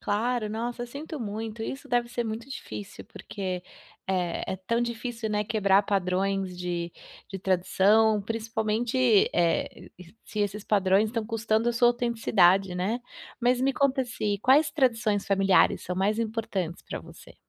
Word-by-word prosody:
Claro, 220 Hz, +1 st, -1 dB
nossa, 240 Hz, +2 st, -3 dB
sinto 295 Hz, +5 st, -7 dB
muito, 220 Hz, 0 st, -5 dB
isso 270 Hz, +4 st, -6 dB
deve 240 Hz, -1 st, +1 dB
ser 240 Hz, 0 st, -2 dB
muito 225 Hz, +3 st, -5 dB
difícil 205 Hz, -6 st, -8 dB
porque, 185 Hz, -3 st, -5 dB, 0.4 s
eh, 180 Hz, -3 st, -1 dB
é -, -, -3 dB
tão 230 Hz, +6 st, -1 dB
difícil, 235 Hz, -1 st, -4 dB
né, 210 Hz, 0 st, 0 dB
quebrar 200 Hz, -2 st, +3 dB
padrões 195 Hz, -1 st, -1 dB
de 175 Hz, -1 st, -3 dB, 0.4 s
de 195 Hz, -, -6 dB
tradição, 200 Hz, +4 st, +3 dB
principalmente, 225 Hz, +2 st, +1 dB
eh, 170 Hz, -1 st, 0 dB
e 180 Hz, +1 st, -14 dB
se 210 Hz, -, -4 dB
esses 205 Hz, +1 st, -1 dB
padrões 200 Hz, 0 st, +3 dB
estão 230 Hz, -1 st, -3 dB
custando 225 Hz, 0 st, 0 dB
a -, -, -3 dB
sua 240 Hz, +1 st, +4 dB
autenticidade, 200 Hz, -6 st, +3 dB
né. 195 Hz, +7 st, -1 dB, 0.4 s
Mas 245 Hz, +1 st, +2 dB
me 270 Hz, +1 st, +2 dB
conta 270 Hz, -1 st, +1 dB
se 210 Hz, -4 st, -2 dB
quais 285 Hz, +4 st, +5 dB
tradições 230 Hz, -8 st, +1 dB
familiares 195 Hz, -1 st, +3 dB
são 180 Hz, -, -4 dB
mais 205 Hz, +3 st, +1 dB
importantes 220 Hz, -6 st, -3 dB
pra -, -, -6 dB
você? -, -, -14 dB
215 Hz, 150 wpm, -27 LUFS, 195-235 Hz, 0.4 s, quais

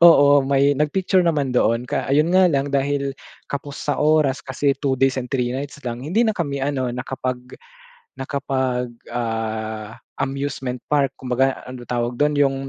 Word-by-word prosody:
Oo, 145 Hz, -4 st, +8 dB
may 140 Hz, +1 st, +4 dB
nag-picture 185 Hz, +5 st, +2 dB
naman 145 Hz, -6 st, +1 dB
doon 115 Hz, 0 st, +2 dB
ka -, -, -2 dB
ayun 155 Hz, +5 st, +3 dB
nga 185 Hz, 0 st, +6 dB
lang 140 Hz, -1 st, 0 dB
dahil 140 Hz, 0 st, 0 dB, 0.4 s
kapos 140 Hz, 0 st, -5 dB
sa 145 Hz, -, -1 dB
oras 150 Hz, -3 st, +3 dB
kasi 140 Hz, +1 st, 0 dB
2 135 Hz, -2 st, 0 dB
days 135 Hz, 0 st, +2 dB
and 125 Hz, -, -7 dB
3 125 Hz, -2 st, 0 dB
nights 140 Hz, +2 st, -5 dB
lang 120 Hz, 0 st, -4 dB
hindi 210 Hz, +11 st, +2 dB
na 220 Hz, -, +2 dB
kami 140 Hz, -5 st, -2 dB
ano 135 Hz, -3 st, 0 dB
nakapag 125 Hz, 0 st, -4 dB, 0.6 s
nakapag, 130 Hz, -3 st, -2 dB, 0.2 s
ah, 110 Hz, -2 st, -3 dB, 0.2 s
amusement 135 Hz, -2 st, -3 dB
park 140 Hz, -3 st, +2 dB
kumbaga 130 Hz, +1 st, 0 dB
ano 130 Hz, -1 st, -8 dB
tawag 120 Hz, 0 st, -1 dB
dun 150 Hz, 0 st, +3 dB
yung 135 Hz, -1 st, +1 dB
135 Hz, 160 wpm, -22 LUFS, 125-145 Hz, 0.6 s, Oo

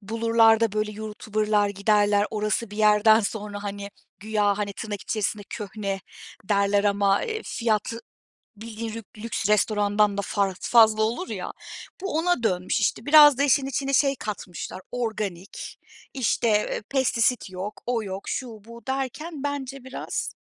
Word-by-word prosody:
bulurlar 225 Hz, +1 st, +3 dB
da, 225 Hz, -3 st, +1 dB
böyle, 215 Hz, 0 st, -1 dB
YouTuber'lar 215 Hz, -1 st, -1 dB
giderler. 205 Hz, +1 st, +2 dB
Orası 215 Hz, 0 st, -1 dB
bir 210 Hz, -, -9 dB
yerden 215 Hz, +1 st, +5 dB
sonra, 205 Hz, -1 st, -4 dB
hani, 200 Hz, 0 st, -6 dB, 0.3 s
güya, 210 Hz, -1 st, +1 dB
hani, 200 Hz, -1 st, -2 dB
tırnak 205 Hz, -1 st, -6 dB
içerisinde, 210 Hz, -1 st, -2 dB
"köhne" 200 Hz, -1 st, -4 dB, 0.4 s
derler 200 Hz, 0 st, +2 dB
ama, 200 Hz, -1 st, +2 dB
eee, 440 Hz, -1 st, -4 dB
fiyat 220 Hz, -2 st, -1 dB, 0.6 s
bildiğin 225 Hz, +1 st, -7 dB
lük 225 Hz, -1 st, -7 dB
lüks 210 Hz, -2 st, -3 dB
restorandan 210 Hz, -1 st, +2 dB
da -, -, +1 dB
faz 195 Hz, -1 st, -1 dB
fazla 220 Hz, -2 st, +5 dB
olur 240 Hz, +12 st, -2 dB
ya. -, -, -4 dB, 0.5 s
Bu 385 Hz, -5 st, -2 dB
ona 345 Hz, -6 st, +1 dB
dönmüş 185 Hz, +1 st, 0 dB
işte. 215 Hz, +2 st, -1 dB
Biraz 295 Hz, -2 st, +8 dB
da 280 Hz, -, +2 dB
işin 275 Hz, -1 st, +3 dB
içine 275 Hz, +1 st, -2 dB
şey 275 Hz, 0 st, +3 dB
katmışlar 190 Hz, -5 st, -6 dB
organik, 210 Hz, -6 st, -4 dB, 0.4 s
işte, 245 Hz, -2 st, 0 dB
eee, 210 Hz, 0 st, +1 dB
"Pestisit 250 Hz, -4 st, +1 dB
yok, 190 Hz, +3 st, -6 dB
o 240 Hz, -2 st, -1 dB
yok, 195 Hz, -1 st, -6 dB
şu 260 Hz, -, -3 dB, 0.2 s
bu..." 235 Hz, +1 st, -11 dB
derken 275 Hz, +3 st, -4 dB
bence 275 Hz, -2 st, -4 dB
biraz 260 Hz, -, -4 dB
215 Hz, 145 wpm, -25 LUFS, 205-235 Hz, 0.6 s, Biraz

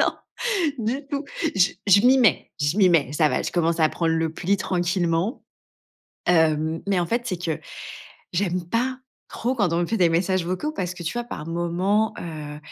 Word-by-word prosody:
non, -, -, +3 dB, 0.7 s
du 255 Hz, +6 st, -2 dB
tout. 285 Hz, 0 st, -2 dB, 0.3 s
J 185 Hz, -2 st, +2 dB
je 200 Hz, 0 st, +7 dB
m'y 255 Hz, +2 st, +6 dB
mets 230 Hz, -9 st, +3 dB
je 145 Hz, +5 st, +1 dB
m'y 195 Hz, -3 st, +5 dB
mets. 145 Hz, -5 st, +2 dB
Ça 150 Hz, 0 st, +3 dB
va, -, -, 0 dB
je -, -, -3 dB
commence 170 Hz, -1 st, +1 dB
à 155 Hz, -, +5 dB
prendre 165 Hz, +1 st, -1 dB
le 160 Hz, -1 st, 0 dB
pli 190 Hz, +4 st, 0 dB
tranquillement, 175 Hz, -, 0 dB, 0.9 s
heu. 160 Hz, -1 st, +2 dB
Mais 200 Hz, -2 st, +1 dB
en 175 Hz, -, 0 dB
fait, 235 Hz, +7 st, 0 dB
c'est 185 Hz, -7 st, -2 dB
que 160 Hz, -4 st, -2 dB, 0.7 s
j'aime 180 Hz, -1 st, -1 dB
pas 250 Hz, +6 st, 0 dB, 0.3 s
trop 245 Hz, +3 st, -2 dB
quand 200 Hz, -9 st, +1 dB
on 170 Hz, -, +1 dB
me -, -, -1 dB
fait 225 Hz, -, -1 dB
des 175 Hz, -2 st, +5 dB
messages 180 Hz, +2 st, +1 dB
vocaux 185 Hz, -, -2 dB
parce 180 Hz, -, -3 dB
que 175 Hz, -, -8 dB
tu 165 Hz, -, -2 dB
vois, -, -, -1 dB
par 155 Hz, -10 st, -7 dB
moments, 175 Hz, +6 st, 0 dB
heu, 150 Hz, -3 st, -7 dB
175 Hz, 200 wpm, -24 LUFS, 165-205 Hz, 0.9 s, je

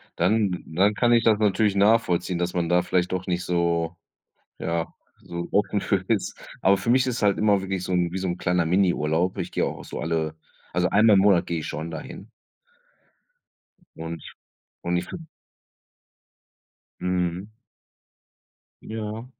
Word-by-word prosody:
Dann 95 Hz, 0 st, +1 dB
dann 95 Hz, +6 st, +2 dB
kann 120 Hz, -1 st, +2 dB
ich 115 Hz, -1 st, +5 dB
das 110 Hz, -2 st, +4 dB
natürlich 105 Hz, 0 st, +2 dB
nachvollziehen, 100 Hz, -4 st, +2 dB
dass 90 Hz, 0 st, -2 dB
man 85 Hz, -2 st, -1 dB
da 90 Hz, 0 st, +4 dB
vielleicht 90 Hz, 0 st, 0 dB
doch 95 Hz, 0 st, -3 dB
nicht 90 Hz, -1 st, -1 dB
so 85 Hz, -1 st, 0 dB, 0.6 s
ja, 85 Hz, 0 st, -2 dB, 0.3 s
so 85 Hz, 0 st, -6 dB
offen 105 Hz, 0 st, +1 dB
für 95 Hz, -2 st, 0 dB
ist. 110 Hz, -4 st, 0 dB, 0.2 s
Aber 95 Hz, +1 st, +5 dB
für 115 Hz, -, -4 dB
mich 130 Hz, +1 st, +4 dB
ist 125 Hz, -1 st, -2 dB
halt 100 Hz, -1 st, +3 dB
immer 105 Hz, -2 st, +3 dB
wirklich 95 Hz, -1 st, -3 dB
so 90 Hz, -, -3 dB
'n 90 Hz, -1 st, +1 dB
wie 95 Hz, -, -3 dB
so 95 Hz, -, -2 dB
'n 90 Hz, 0 st, -2 dB
kleiner 90 Hz, -1 st, +1 dB
Miniurlaub. 90 Hz, -1 st, +1 dB
Ich -, -, -4 dB
gehe -, -, +1 dB
auch -, -, -5 dB
so -, -, -7 dB
alle 80 Hz, -1 st, -1 dB, 0.4 s
also 90 Hz, 0 st, +1 dB
einmal 105 Hz, +2 st, +5 dB
im 95 Hz, -, +5 dB
Monat 95 Hz, -3 st, +4 dB
gehe 85 Hz, -1 st, -1 dB
ich 80 Hz, -, -5 dB
schon 80 Hz, +2 st, -5 dB
da 80 Hz, -2 st, -5 dB
hin. 105 Hz, -, -10 dB, 1.7 s
Und 80 Hz, -1 st, -6 dB, 0.6 s
und 85 Hz, 0 st, 0 dB
ich 90 Hz, -, -2 dB
v -, -, -7 dB, 1.8 s
Mhm. 90 Hz, +3 st, -2 dB, 1.3 s
Ja. 110 Hz, +1 st, -5 dB
90 Hz, 165 wpm, -25 LUFS, 85-105 Hz, 1.8 s, ich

